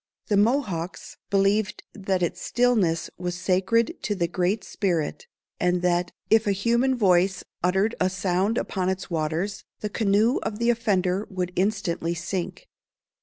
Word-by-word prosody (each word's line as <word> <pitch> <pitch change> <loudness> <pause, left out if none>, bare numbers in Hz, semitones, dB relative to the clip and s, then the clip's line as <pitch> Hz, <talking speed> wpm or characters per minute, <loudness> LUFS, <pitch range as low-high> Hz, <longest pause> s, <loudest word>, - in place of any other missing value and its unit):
The 205 - +3
Mohawks 205 - 0
believed 195 +1 +1
that 190 -3 -1
its 170 - -2
stillness 225 -9 +1
was 180 -1 -3
sacred 195 - +1
to 205 - -1
the 175 -3 0
Great 185 +4 0
Spirit, 190 - -2 0.3
and 180 0 +1
that, 175 0 +1 0.2
if 220 -1 +5
a 200 - +3
human 235 +6 +2
voice 190 -4 +3 0.2
uttered 190 +5 +2
a 185 - +2
sound 185 +4 0
upon 185 -2 -1
its 190 -1 -4
waters, 165 +5 -2 0.2
the 210 - -2
canoe 215 +3 +2
of 210 - -3
the 235 +1 +3
offender 200 -4 0
would 180 -2 -3
instantly 180 -4 0
sink. 175 - -4
190 Hz, 145 wpm, -25 LUFS, 180-215 Hz, 0.3 s, if